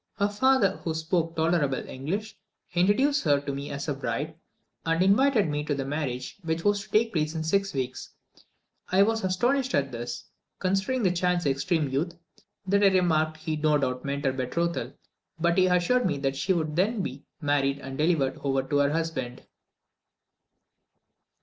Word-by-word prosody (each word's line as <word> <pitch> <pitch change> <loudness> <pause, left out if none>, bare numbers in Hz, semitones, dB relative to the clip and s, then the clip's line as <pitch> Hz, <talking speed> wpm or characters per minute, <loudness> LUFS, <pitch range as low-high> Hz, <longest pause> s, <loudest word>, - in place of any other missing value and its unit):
Her 200 +1 +2
father, 210 -2 +3
who 160 -2 -4
spoke 165 +1 -1
tolerable 160 -5 +1
English, 200 +11 -4 0.4
introduced 210 +12 +3
her 145 -3 +3
to 140 -1 -4
me 140 +1 -5
as 140 +1 -5
a 145 - 0
bride, 140 +3 -3 0.5
and 165 +2 +2
invited 215 +1 +4
me 150 0 -2
to 145 - 0
the 135 -1 -3
marriage 135 0 -4
which 165 -1 -2
was 205 0 +3
to - - -12
take 225 +1 +2
place 155 -1 -1
in 160 - -2
six 195 +4 +1
weeks. 130 -2 -4 0.8
I 190 +2 +6
was 225 +2 +1
so 190 - 0
astonished 250 +8 +1
at 135 -1 0
this, 120 0 -5 0.3
considering 195 +7 0
the 185 - +3
child's 180 -1 0
extreme 145 +3 +1
youth, 150 +6 -2 0.5
that 200 +2 +2
I - - +8
remarked 160 -5 +2
he 155 0 -3
no 150 0 +2
doubt 130 -3 -2
meant 140 +1 -3
her 135 - +2
betrothal, 170 +7 -2 0.5
but 170 +1 +2
he 185 - +5
assured 185 +7 +2
me 150 -5 -1
that 135 -1 -1
she 140 +8 -1
would 160 -4 0
then 200 +4 +1
be 135 -2 -6 0.2
married 145 -2 +1
and 135 -1 -7
delivered 150 -3 +1
over 135 -1 +1
to 140 +2 -1
her 140 0 +3
husband. 150 -6 -3
160 Hz, 175 wpm, -27 LUFS, 140-190 Hz, 0.8 s, I